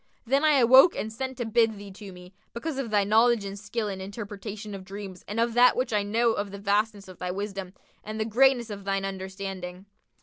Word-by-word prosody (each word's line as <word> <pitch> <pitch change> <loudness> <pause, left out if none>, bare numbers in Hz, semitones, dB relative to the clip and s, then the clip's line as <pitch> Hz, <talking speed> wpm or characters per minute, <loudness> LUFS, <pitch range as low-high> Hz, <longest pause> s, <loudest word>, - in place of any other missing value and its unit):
Then 275 +5 +2
I 310 -1 +5
awoke 260 +6 +7
and 220 +1 -4
sent 260 +2 -5
to 240 - -2
bid 225 -1 +2
thee 200 0 -10
to 195 +1 -10
me, 180 +1 -13 0.2
because 280 +3 -4
of 255 -4 -3
thy 205 -1 +3
knowledge 220 +1 +3
and 195 0 -6
skill 210 +2 -3
in 195 -2 -4
the 190 - -5
interpretation 205 0 -7
of 195 -1 -7
dreams 195 -1 -9
and 210 +3 -3
of 230 0 +1
that 245 +1 +6
which 250 -2 -1
I 210 - +3
know 225 +3 +2
of 205 -1 -3
the 200 - -8
vastness 205 0 0
of 185 -2 -12
thy 180 - -3
wisdom 195 -1 -5 0.3
and 215 +1 -6
the 215 - 0
greatness 240 0 +3
of 200 -1 -7
thine 195 0 -1
understanding." 190 -1 -6
205 Hz, 230 wpm, -27 LUFS, 195-235 Hz, 0.3 s, awoke